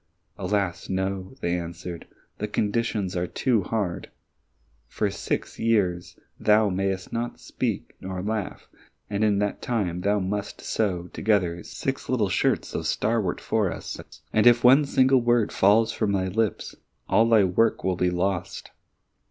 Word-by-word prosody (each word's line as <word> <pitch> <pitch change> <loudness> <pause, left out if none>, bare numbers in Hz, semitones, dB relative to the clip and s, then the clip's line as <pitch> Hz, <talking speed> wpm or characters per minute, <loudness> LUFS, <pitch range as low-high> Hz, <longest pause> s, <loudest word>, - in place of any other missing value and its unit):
"Alas, 95 -2 -2
no," 95 +2 -2
they 85 0 0
answered, 85 0 -6 0.3
"the 105 - -2
conditions 105 -2 -1
are 90 0 -1
too 120 0 +1
hard! 95 -2 -3 0.8
For - - -1
six - - -4
years 95 -6 0 0.2
thou 105 0 +4
mayst 95 0 -2
neither 120 +1 -3
speak - - -4
nor 95 -1 -5
laugh, 105 -1 -3 0.4
and 100 +1 0
in 105 -2 +3
that 105 0 -1
time 95 -8 -1
thou 105 +2 +2
must 100 +2 -3
sew 95 -6 -1
together 90 -6 +1
six 135 +9 -4
little 110 -6 +1
shirts 90 - 0
of - - -2
starwort 105 -5 0
for 105 -5 0
us. - - -6 0.3
And 110 +2 +4
if 120 -1 +6
one 135 +4 +7
single 130 -1 +4
word 120 -2 +2
falls 110 +3 +4
from 105 -3 -1
thy 95 -1 0
lips, 110 +2 -1 0.3
all 115 +1 +4
thy 110 -3 +6
work 95 +5 +2
will 95 -1 +1
be 90 0 +1
lost." 90 +1 -2
100 Hz, 150 wpm, -25 LUFS, 90-110 Hz, 0.8 s, one